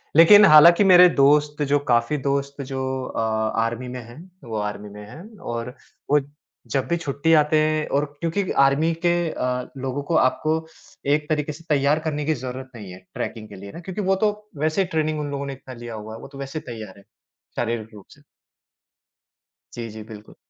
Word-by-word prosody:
लेक़िन 205 Hz, +6 st, +9 dB
हालाँकि 170 Hz, +4 st, +8 dB
मेरे 180 Hz, -2 st, +8 dB
दोस्त 150 Hz, +1 st, +3 dB
जो 145 Hz, +1 st, +3 dB
काफ़ी 120 Hz, +5 st, +2 dB
दोस्त 140 Hz, 0 st, -2 dB
जो 130 Hz, -1 st, -3 dB
अ, -, -, -4 dB, 0.4 s
आर्मी 115 Hz, +2 st, -3 dB
में 125 Hz, 0 st, -6 dB
हैं, 120 Hz, +5 st, -13 dB, 0.2 s
वो 115 Hz, -3 st, -5 dB
आर्मी 105 Hz, 0 st, -4 dB
में 105 Hz, +1 st, -11 dB
हैं। 205 Hz, -, -12 dB
और 120 Hz, +1 st, -5 dB, 0.4 s
वो 150 Hz, -, +6 dB, 0.5 s
जब 135 Hz, -2 st, 0 dB
भी 170 Hz, -, +1 dB
छुट्टी 165 Hz, 0 st, 0 dB
आते 150 Hz, +1 st, +1 dB
हैं 155 Hz, 0 st, 0 dB
और 145 Hz, -, +1 dB, 0.2 s
क्योंकि 175 Hz, +3 st, -1 dB
आर्मी 140 Hz, +4 st, +3 dB
के 175 Hz, -, +4 dB, 0.2 s
अ, 125 Hz, -3 st, -3 dB
लोगों 135 Hz, +2 st, -4 dB
को 165 Hz, -, -2 dB
आपको 155 Hz, +3 st, +2 dB, 0.6 s
एक 150 Hz, 0 st, -1 dB
तरीक़े 150 Hz, -1 st, -1 dB
से 165 Hz, -, -14 dB
तैयार 145 Hz, +1 st, +2 dB
करने 150 Hz, -2 st, -3 dB
की 155 Hz, -, +1 dB
ज़रूरत 130 Hz, 0 st, -7 dB
नहीं 100 Hz, -5 st, -9 dB
है 90 Hz, -, -11 dB
ट्रैकिंग 110 Hz, -2 st, -5 dB
के 100 Hz, -, -11 dB
लिए। 100 Hz, +1 st, -10 dB
है -, -, -12 dB
ना? -, -, -7 dB
क्योंकि 185 Hz, +4 st, -5 dB
वो 190 Hz, -1 st, +2 dB
तो 210 Hz, -, +3 dB, 0.3 s
वैसे 155 Hz, +5 st, 0 dB
ही 190 Hz, -, -1 dB
ट्रेनिंग 155 Hz, -2 st, -1 dB
उन 145 Hz, -1 st, -4 dB
लोगों 140 Hz, 0 st, -4 dB
ने 140 Hz, -, -5 dB
इतना 130 Hz, -1 st, -11 dB
लिया 120 Hz, -1 st, -8 dB
हुआ 110 Hz, +1 st, -8 dB
है, -, -, -10 dB
वो -, -, -9 dB
तो 140 Hz, -, -13 dB
वैसे 140 Hz, +3 st, -5 dB
ही -, -, -16 dB
तैयार 110 Hz, -4 st, -9 dB
हैं, 100 Hz, -, -18 dB, 0.5 s
शारीरिक 115 Hz, -2 st, -3 dB
रूप 100 Hz, -2 st, -13 dB
से। -, -, -19 dB, 1.5 s
जी, 115 Hz, -1 st, -6 dB
जी। 110 Hz, 0 st, -9 dB
बिल्कुल। 105 Hz, 0 st, -13 dB
140 Hz, 205 wpm, -23 LUFS, 120-155 Hz, 1.5 s, लेक़िन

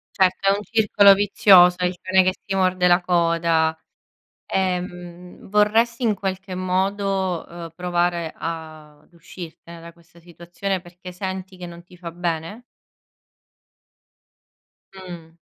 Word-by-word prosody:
Certo, 190 Hz, 0 st, +2 dB
è -, -, +6 dB
un 205 Hz, -, -6 dB
circolo 210 Hz, -3 st, +5 dB
vizioso, 190 Hz, -3 st, +5 dB
è 180 Hz, -, -1 dB
il 180 Hz, 0 st, -1 dB
cane 185 Hz, 0 st, +3 dB
che 185 Hz, 0 st, +1 dB
si 195 Hz, -, -4 dB
morde 185 Hz, -1 st, +1 dB
la 175 Hz, +1 st, +4 dB
coda. 165 Hz, -2 st, +1 dB, 0.7 s
Ehm, 180 Hz, -1 st, -4 dB
vorresti 225 Hz, +4 st, +2 dB
in 220 Hz, -, +2 dB
qualche 190 Hz, -1 st, -5 dB
modo, 190 Hz, 0 st, -1 dB
uhm, 170 Hz, -1 st, -9 dB
provare 175 Hz, -1 st, -1 dB
ad 155 Hz, -2 st, -8 dB
uscirtene 170 Hz, 0 st, -12 dB
da 170 Hz, 0 st, -12 dB
questa 170 Hz, 0 st, -22 dB
situazione, 175 Hz, +3 st, -5 dB
perché 180 Hz, +1 st, -12 dB
senti 190 Hz, +1 st, -6 dB
che 180 Hz, -, -8 dB
non 170 Hz, 0 st, -11 dB
ti 180 Hz, +1 st, -18 dB
fa 170 Hz, -1 st, -8 dB
bene? 170 Hz, +5 st, -4 dB, 2.3 s
Mh. 175 Hz, -4 st, -10 dB
180 Hz, 130 wpm, -22 LUFS, 170-190 Hz, 2.3 s, è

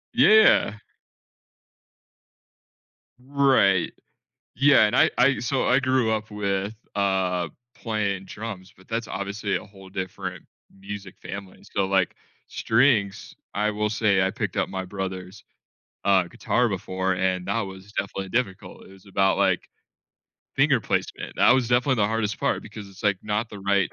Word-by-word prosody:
Yeah. 220 Hz, -, +6 dB, 2.4 s
Right. 130 Hz, -9 st, +3 dB, 0.6 s
Yeah, 135 Hz, -1 st, +6 dB
and 105 Hz, -, 0 dB
I -, -, +5 dB
I 130 Hz, +1 st, +4 dB
So, 125 Hz, +3 st, 0 dB
I 125 Hz, +2 st, +4 dB
grew 130 Hz, -4 st, +1 dB
up 110 Hz, 0 st, -2 dB
with, 100 Hz, 0 st, -2 dB, 0.2 s
uh, 95 Hz, -4 st, 0 dB, 0.2 s
playing 100 Hz, -4 st, -2 dB
drums, 100 Hz, -3 st, -7 dB
but 95 Hz, -, -20 dB
that's 115 Hz, 0 st, -3 dB
obviously 100 Hz, +1 st, -3 dB
a -, -, -4 dB
whole 95 Hz, -1 st, -15 dB
different 95 Hz, -1 st, -6 dB, 0.3 s
music 100 Hz, -1 st, -9 dB
family, 100 Hz, -1 st, -9 dB
so, 100 Hz, -1 st, -1 dB
like, 95 Hz, -2 st, +1 dB, 0.3 s
strings, 110 Hz, -5 st, +1 dB, 0.2 s
I 105 Hz, +1 st, +1 dB
will 105 Hz, 0 st, -1 dB
say 105 Hz, -3 st, +2 dB
I 95 Hz, -, +2 dB
picked -, -, -4 dB
up -, -, 0 dB
my 95 Hz, -1 st, -4 dB
brother's, 95 Hz, -1 st, -6 dB, 0.6 s
uh, 95 Hz, -2 st, +5 dB
guitar 120 Hz, +7 st, 0 dB
before 95 Hz, 0 st, -2 dB
and 95 Hz, 0 st, -1 dB
that 115 Hz, -, 0 dB
was 95 Hz, +1 st, -9 dB
definitely 95 Hz, -1 st, -3 dB
difficult, 110 Hz, -5 st, -3 dB
it -, -, -16 dB
was 95 Hz, +1 st, -17 dB
about, 95 Hz, -1 st, +1 dB
like, 95 Hz, -3 st, +1 dB, 0.9 s
finger -, -, +3 dB
placement, -, -, -3 dB
that -, -, +5 dB
was 125 Hz, -1 st, +4 dB
definitely 125 Hz, +2 st, +2 dB
the 105 Hz, -2 st, +2 dB
hardest 110 Hz, -1 st, -1 dB
part, -, -, 0 dB
because 105 Hz, -2 st, -10 dB
it's, 95 Hz, +1 st, -14 dB
like, 100 Hz, -3 st, +2 dB
not 105 Hz, +2 st, -1 dB
the 105 Hz, -, -9 dB
right 100 Hz, -1 st, +1 dB
100 Hz, 150 wpm, -25 LUFS, 95-110 Hz, 2.4 s, Yeah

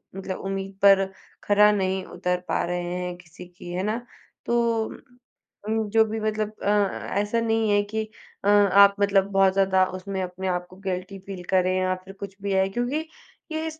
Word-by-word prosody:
मतलब 190 Hz, -1 st, -5 dB
उम्मीद 195 Hz, 0 st, -3 dB
पर 195 Hz, -1 st, +6 dB, 0.4 s
खरा 210 Hz, +1 st, +5 dB
नहीं 190 Hz, -2 st, 0 dB
उतर 180 Hz, 0 st, -2 dB
पा -, -, 0 dB
रहे 175 Hz, 0 st, -2 dB
हैं, 180 Hz, 0 st, -4 dB
किसी 180 Hz, 0 st, -13 dB
की, 175 Hz, 0 st, -11 dB
है 185 Hz, +1 st, -2 dB
ना? 225 Hz, +4 st, -2 dB, 0.4 s
तो 235 Hz, -2 st, +1 dB, 0.8 s
उम, 220 Hz, 0 st, 0 dB
जो 220 Hz, +2 st, +5 dB
भी 220 Hz, +1 st, -4 dB
मतलब 215 Hz, 0 st, -1 dB
अ, -, -, +1 dB, 0.5 s
ऐसा 210 Hz, +3 st, 0 dB
नहीं 225 Hz, -1 st, +1 dB
है 205 Hz, -, +4 dB
कि 220 Hz, +2 st, -3 dB, 0.4 s
अ, -, -, +1 dB
आप 200 Hz, -1 st, +6 dB
मतलब 200 Hz, -1 st, +4 dB
बहुत 195 Hz, -1 st, +4 dB
ज़्यादा 190 Hz, -1 st, +3 dB
उसमें 190 Hz, 0 st, -4 dB
अपने 185 Hz, +1 st, -5 dB
आप 180 Hz, -1 st, -1 dB
को 185 Hz, -, -14 dB
गिल्टी 185 Hz, +1 st, -3 dB
फ़ील 190 Hz, -1 st, -8 dB
करें 185 Hz, -1 st, +3 dB
या 185 Hz, 0 st, +1 dB
फिर 195 Hz, -, -10 dB
कुछ 195 Hz, -1 st, -7 dB
भी 200 Hz, 0 st, -2 dB
आए। 190 Hz, 0 st, +2 dB
क्योंकि 245 Hz, +9 st, -2 dB, 0.5 s
ये 315 Hz, 0 st, -2 dB
स 315 Hz, -, -14 dB
195 Hz, 185 wpm, -25 LUFS, 185-215 Hz, 0.8 s, पर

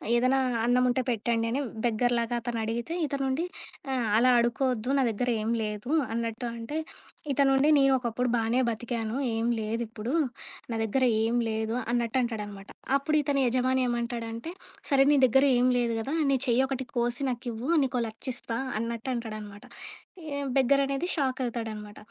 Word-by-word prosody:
ఏదైనా 255 Hz, +3 st, +3 dB, 0.3 s
అన్నం 250 Hz, +1 st, +3 dB
ఉంటే 245 Hz, +1 st, +1 dB
పెట్టండి 230 Hz, 0 st, 0 dB
అని 270 Hz, +4 st, 0 dB, 0.2 s
బెగ్గర్‌లాగా 240 Hz, +1 st, +1 dB
అతను 230 Hz, -1 st, -3 dB
అడిగితే 235 Hz, +8 st, -3 dB
ఇతను 280 Hz, -1 st, -2 dB
ఉండి 285 Hz, +6 st, 0 dB, 0.5 s
ఆహ్, 245 Hz, -3 st, 0 dB
అలా 250 Hz, +2 st, +5 dB
అడుకోవద్దు 250 Hz, +1 st, 0 dB
నా -, -, +3 dB
దగ్గరేం 225 Hz, 0 st, -1 dB
లేదు. 210 Hz, +4 st, -4 dB, 0.2 s
అన్నట్టు 230 Hz, +1 st, -3 dB
అంటే 230 Hz, +7 st, -4 dB, 0.6 s
ఇతనుండి 270 Hz, +1 st, +4 dB
నేను 275 Hz, -1 st, +5 dB
ఒకప్పుడు 245 Hz, 0 st, -1 dB
బానే 230 Hz, +2 st, +1 dB
బతికాను 230 Hz, 0 st, -3 dB, 0.2 s
ఏం 225 Hz, +1 st, -1 dB
లేదిప్పుడు. 225 Hz, +2 st, -3 dB, 0.6 s
నా -, -, -1 dB
దగ్గర 260 Hz, +5 st, 0 dB, 0.2 s
ఏం 230 Hz, +2 st, +1 dB
లేదు 220 Hz, +1 st, -2 dB, 0.2 s
అన్నట్టు 240 Hz, 0 st, 0 dB
అంటాడనమాట. 205 Hz, -4 st, -5 dB, 0.3 s
అప్పుడు 290 Hz, +2 st, -1 dB
ఇతని 280 Hz, -1 st, 0 dB
యజమాని 255 Hz, +1 st, +1 dB
ఏమంటాడంటే 235 Hz, +2 st, -3 dB, 0.4 s
సరే 270 Hz, -1 st, +5 dB
నీ -, -, +5 dB
దగ్గర 265 Hz, +2 st, +4 dB
ఏం 245 Hz, +1 st, +3 dB
లేదు 235 Hz, -1 st, 0 dB
గదా! 270 Hz, +8 st, -2 dB, 0.2 s
నీ 270 Hz, -, +3 dB
చెయ్యి 245 Hz, +2 st, +3 dB
ఒకటి 265 Hz, -1 st, -3 dB
కోసి 240 Hz, +1 st, 0 dB
నాకివ్వు 240 Hz, +1 st, -5 dB
నీకో 255 Hz, -2 st, 0 dB
1,00,000 220 Hz, +5 st, -12 dB
ఇస్తా 230 Hz, -, -4 dB, 0.2 s
అన్నట్టు 230 Hz, +2 st, -3 dB
అంటాడనమాట. 215 Hz, -3 st, -7 dB, 0.6 s
యె 285 Hz, -2 st, -3 dB, 0.2 s
బెగ్గర్ 275 Hz, +1 st, +4 dB
అనేది 275 Hz, +5 st, -1 dB
షాక్ 265 Hz, -4 st, 0 dB
అవుతాడన్నమాట. 220 Hz, -3 st, -5 dB
240 Hz, 150 wpm, -28 LUFS, 225-260 Hz, 0.6 s, అలా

